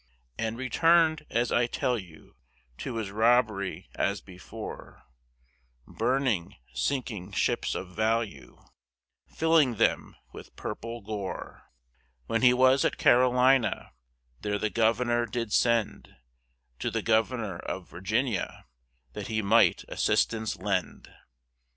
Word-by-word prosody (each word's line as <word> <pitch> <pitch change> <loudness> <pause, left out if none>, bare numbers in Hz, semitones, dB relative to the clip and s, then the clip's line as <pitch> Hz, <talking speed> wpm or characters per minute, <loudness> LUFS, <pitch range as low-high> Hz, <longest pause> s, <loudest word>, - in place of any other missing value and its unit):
And 115 0 -2
returned, 160 +4 +3
as 120 +1 0
I 120 0 +2
tell 125 +1 -1
you, 85 -8 -11 0.4
To - - -5
his 110 -4 -3
Robbery 110 -3 +1
as 100 +1 -1
before, 90 -2 -10 0.8
Burning, 120 -6 -1 0.2
sinking 110 -8 -3
Ships - - 0
of 95 - -5
value, 110 0 -2 0.6
Filling 160 -6 +2
them - - 0 0.2
with - - -12
Purple 115 0 -6
Gore; 100 -2 -6 0.6
When 115 - -1
he 125 -1 +7
was 130 +2 +4
at - - 0
Carolina, 125 0 +3 0.5
There 105 0 -1
the 105 +1 -2
Governor 120 +1 +1
did 115 -3 -3
send 115 -3 +1 0.6
To - - -1
the - - -3
Governor 110 -4 0
of 95 -2 -6
Virginia, 110 +4 -2 0.5
That - - -6
he 110 -1 -1
might 110 +4 +4
assistance 110 -1 0
lend. 95 0 -3
115 Hz, 115 wpm, -28 LUFS, 105-125 Hz, 0.8 s, he